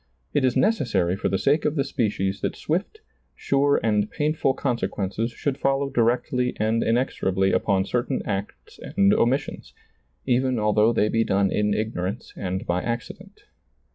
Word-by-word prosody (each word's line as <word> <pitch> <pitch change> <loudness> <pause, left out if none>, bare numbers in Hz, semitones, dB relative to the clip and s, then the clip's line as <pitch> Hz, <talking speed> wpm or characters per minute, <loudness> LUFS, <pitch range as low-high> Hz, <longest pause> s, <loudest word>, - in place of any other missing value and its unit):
It 145 - +2
is 130 -2 +2
necessary 110 - +1
for - - -1
the 95 - +1
sake 145 +9 +2
of 150 0 0
the 140 - +1
species 100 -7 -1
that - - -2
swift, 195 - -3 0.3
sure 140 +1 +2
and 105 -2 +1
painful 150 -3 0
conse 125 -5 -1
quences 105 +4 -3
should 140 -1 -2
follow 135 0 0
directly 125 +1 0
and 110 +2 +1
inexorably 95 -5 +1
upon 95 0 +1
certain 125 +4 -1
acts 100 -1 -5
and 100 0 +2
omissions, 135 +4 -1 0.5
even 130 0 +1
although 105 +1 +3
they 110 -2 +2
be 115 +1 +1
done 100 -2 +1
in 105 0 +1
ignorance 110 -1 -3
and 95 -1 -4
by 90 +1 0
accident. 120 0 -6
115 Hz, 155 wpm, -24 LUFS, 100-135 Hz, 0.5 s, although